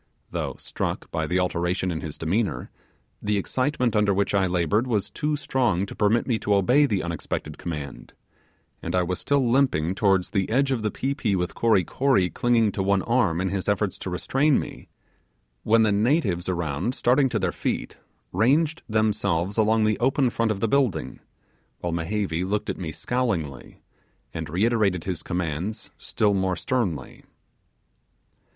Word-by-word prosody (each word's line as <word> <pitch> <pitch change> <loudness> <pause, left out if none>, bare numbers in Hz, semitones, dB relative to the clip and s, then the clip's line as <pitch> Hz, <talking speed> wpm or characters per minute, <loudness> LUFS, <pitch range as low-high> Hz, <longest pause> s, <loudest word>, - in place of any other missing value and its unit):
Though - - -3
struck - - -4
by 80 -1 -1
the 90 - 0
alteration 90 +1 0
in 80 - -3
his 75 -2 -6
demeanour, 85 - -1 0.5
the 105 0 0
excitement 125 +3 0
under 105 -2 +3
which 100 +1 0
I 95 -2 +3
laboured 90 +7 +1
was 105 -5 -1
too 150 -1 -1
strong 120 -10 0
to - - -9
permit 105 +3 +2
me 115 -4 0
to 105 - +1
obey 125 +10 +4
the 100 -6 -1
unexpected 80 -2 -4
command, 75 -5 -6 0.7
and 85 +2 -3
I 90 - +3
was 90 +1 -2
still 140 -3 +1
limping 115 - +2
towards 95 -2 +2
the 95 -2 0
edge 135 +4 +2
of 125 -4 0
the 105 - 0
pi 135 +6 -2
pi 110 -8 0
with 90 -1 -2
Kory 110 -5 +3
Kory 130 - +1
clinging 115 -3 +2
to 100 - -3
one 95 0 +2
arm 105 -9 +1
in 95 +1 0
his 95 +1 -2
efforts 100 -2 0
to - - -5
restrain 135 +10 +2
me, - - -8 0.7
when 110 +1 +4
the 110 - +3
natives 100 - +1
around 85 - -2
started 130 +2 +3
to 115 - -1
their 95 -4 0
feet, - - -3 0.3
ranged 145 - +2
themselves 100 -4 +1
along 110 0 +3
the 110 -1 +1
open 130 0 +2
front 115 -1 0
of 100 -2 -2
the 115 - +2
building, 120 - 0 0.6
while 85 -1 -2
Mehevi 85 0 -1
looked 100 +3 -1
at - - -8
me 85 -4 -4
scowlingly, 100 - -3 0.5
and - - -5
reiterated 100 -1 +1
his 90 -3 -3
commands 90 +4 -3
still 105 -2 +1
more 95 -1 0
sternly. 90 - -2
100 Hz, 170 wpm, -25 LUFS, 90-120 Hz, 0.7 s, obey